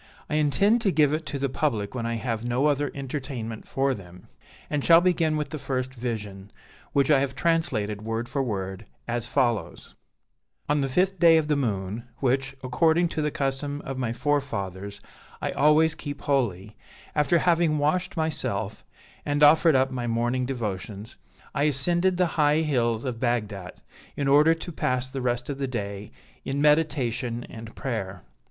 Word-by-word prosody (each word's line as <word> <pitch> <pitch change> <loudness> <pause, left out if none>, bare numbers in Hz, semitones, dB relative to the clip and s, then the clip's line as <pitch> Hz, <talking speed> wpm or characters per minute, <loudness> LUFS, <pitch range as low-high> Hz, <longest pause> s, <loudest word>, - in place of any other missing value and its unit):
I 150 - +2
intend 200 +10 +3
to 205 -4 +2
give 150 -3 +3
it 155 0 -2
to 140 - -3
the 140 0 0
public 125 -7 -1
when 120 -2 -3
I 115 - -1
have 115 -1 -3
no 120 +4 0
other 145 -1 +2
entertainment 130 -5 -5
for 135 0 +1
them; 90 -5 -12 0.4
and 145 -2 -2
shall 165 0 +7
begin 170 -3 +2
with 150 -2 -2
the 155 - -5
first 130 -1 -3
Vision, 105 -5 -5 0.4
which 140 +1 +2
I 140 - +6
have 135 -1 -2
translated 135 -12 0
word 115 +2 -3
for 135 +2 -1
word, 95 -4 -4 0.2
as 120 -1 -1
follows: 120 -5 -1 0.7
"On 150 0 +2
the 135 - -1
fifth 185 +7 +1
day 165 -2 +7
of 155 -1 0
the 150 - +3
moon, 110 -4 -2
which, 135 +1 0
according 160 +6 +2
to 155 - -2
the 150 - +1
custom 140 +1 -2
of 135 -1 -4
my 120 -3 -1
forefathers, 100 -8 -2 0.4
I - - -2
always 155 +2 +4
keep 145 -2 -7
holy, 110 -7 -1 0.4
after 150 +3 +3
having 170 -2 +2
washed 165 +6 0
myself, 160 -1 -2 0.4
and 145 0 +1
offered 155 +1 +6
up 130 0 +3
my 125 -2 -3
morning 120 +2 0
devotions, 105 -2 -5 0.4
I 145 0 +1
ascended 175 +6 +1
the 180 - +3 0.2
high 150 +1 +4
hills 120 -6 0
of 125 -3 -3
Bagdat, 105 -7 -2 0.4
in 140 - 0
order 150 +4 +5
to 165 +2 -7
pass 125 -4 0
the 135 -1 -4
rest 120 -1 -1
of 140 -1 -4
the 135 - -1
day 100 -4 -5 0.3
in 135 +1 -2
meditation 140 -6 +1
and 110 0 -9
prayer. 100 -8 -4
135 Hz, 170 wpm, -26 LUFS, 115-150 Hz, 0.7 s, shall